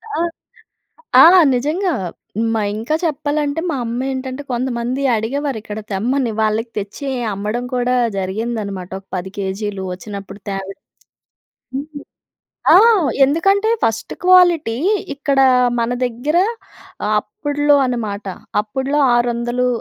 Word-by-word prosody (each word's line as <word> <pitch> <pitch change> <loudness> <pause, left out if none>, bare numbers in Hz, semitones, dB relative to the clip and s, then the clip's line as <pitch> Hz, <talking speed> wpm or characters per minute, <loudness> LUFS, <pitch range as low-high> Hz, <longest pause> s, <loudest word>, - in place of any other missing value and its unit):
ఆ! - - -1 1.0
ఆ! - - +10 0.3
నిజంగా. 320 +9 0 0.6
మా 220 - 0 0.2
ఇంకా 235 +8 -1
చెప్పాలంటే 295 -1 -1
మా - - -1
అమ్మ 235 +2 -3
ఏంటంటే 260 +1 -5
కొంతమంది 245 +1 -2
అడిగేవారు. 270 +5 -2
ఇక్కడ 210 0 -6
తెమ్మని 240 +5 0
వాళ్ళకి 220 +2 0
తెచ్చి 210 +8 -5 0.3
అమ్మడం 210 +5 -3
కూడా 250 0 +1 0.2
జరిగిందన్నమాట. 200 -1 -3
ఒక 195 - -25
10 185 +1 -4
కేజీ‌లు 200 0 -3
వచ్చినప్పుడు 200 +1 -8
తేవడం. 195 +6 -6 0.9
హ్మ్ 290 +1 -6 0.7
ఆ! - - +9 0.5
ఎందుకంటే 390 +9 +2
ఫస్ట్ 225 0 -1
క్వాలిటీ 350 -10 +5 0.4
ఇక్కడ 280 -1 0 0.4
మన 230 0 0 0.2
దగ్గర 250 +7 -1 0.8
అప్పడులో 290 +6 +1
అనమాట. 215 -5 -3 0.4
అప్పడులో 265 +7 -2 0.2
ఆరు 240 0 +2
వందలు 240 +1 -1
240 Hz, 110 wpm, -18 LUFS, 210-285 Hz, 1.0 s, ఆ